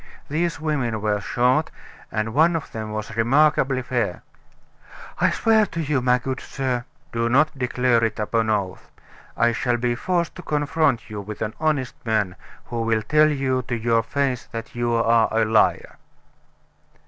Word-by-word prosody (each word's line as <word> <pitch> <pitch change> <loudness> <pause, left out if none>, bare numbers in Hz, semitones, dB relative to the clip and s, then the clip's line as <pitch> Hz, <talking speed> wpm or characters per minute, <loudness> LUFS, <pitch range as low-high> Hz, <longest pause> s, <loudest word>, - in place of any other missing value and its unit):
These 165 +2 -1
women 140 -8 -1
were 105 -1 0
short, 125 +8 +1 0.4
and 110 +1 -2
one 165 +5 +4
of 160 - -4
them 110 -1 -5
was 110 +1 -5
remarkably 135 +2 +3
fair." 120 -7 -2 1.0
"I - - +4
swear 220 -2 +3
to 165 - -6
you, 150 -4 0
my 125 0 +3
good 130 +1 -4
sir 125 -3 -3
" - - -37
"Do 115 0 0
not 150 +5 +3
declare 125 -2 +1
it 115 - 0
upon 110 +1 0
oath. 100 -4 -2 0.5
I 120 0 +3
shall 120 +1 0
be 120 0 0
forced 170 +6 -1
to - - -7
confront 145 -6 0
you 105 -1 -5
with 105 +1 -6
an 110 0 -3
honest 150 -5 0
man, 110 -5 0 0.3
who 120 -1 -4
will 115 -1 0
tell 155 +5 +4
you 135 -3 0
to 120 - -1
your 115 0 +2
face 130 +1 -2
that 115 0 -7
you 120 0 -1
are 115 -1 +3
a 110 0 +2
liar!" 110 0 +2
120 Hz, 170 wpm, -23 LUFS, 115-145 Hz, 1.0 s, one